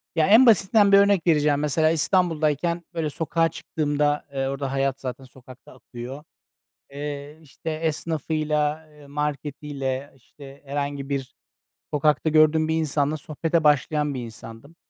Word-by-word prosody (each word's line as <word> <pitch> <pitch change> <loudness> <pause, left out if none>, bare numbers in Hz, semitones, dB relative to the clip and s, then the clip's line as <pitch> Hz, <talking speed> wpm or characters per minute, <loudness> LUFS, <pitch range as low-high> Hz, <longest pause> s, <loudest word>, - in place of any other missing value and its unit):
ya, 160 -1 +3
en 225 +6 +7
basitinden 205 -2 +5
bir 200 - +8
örnek 200 -3 +3
vereceğim, 150 -2 +3
mesela 155 +2 +2
İstanbul'dayken, 165 -1 +1
böyle, 160 -2 -2
sokağa 165 +2 0
çıktığımda, 150 -1 -1
eee, 135 -1 -1
orada 135 0 -3
hayat 135 0 -1
zaten 130 0 -6
sokakta 130 0 -15
akıyor, 130 +3 -9 0.7
eee, 145 +1 -6
işte, 160 +2 -7
esnafıyla, 155 -1 -1
eee, 150 -1 -17
marketiyle, 140 -1 -4
işte, 135 +2 -15
herhangi 140 0 -4
bir 135 -2 -4 0.6
sokakta 150 +1 +2
gördüğüm 155 0 +4
bir 160 - 0
insanla 155 -1 0
sohbete 160 +3 -1
başlayan 150 0 +2
bir 125 -2 -4
insandım. 115 +6 -12
150 Hz, 135 wpm, -24 LUFS, 140-160 Hz, 0.7 s, bir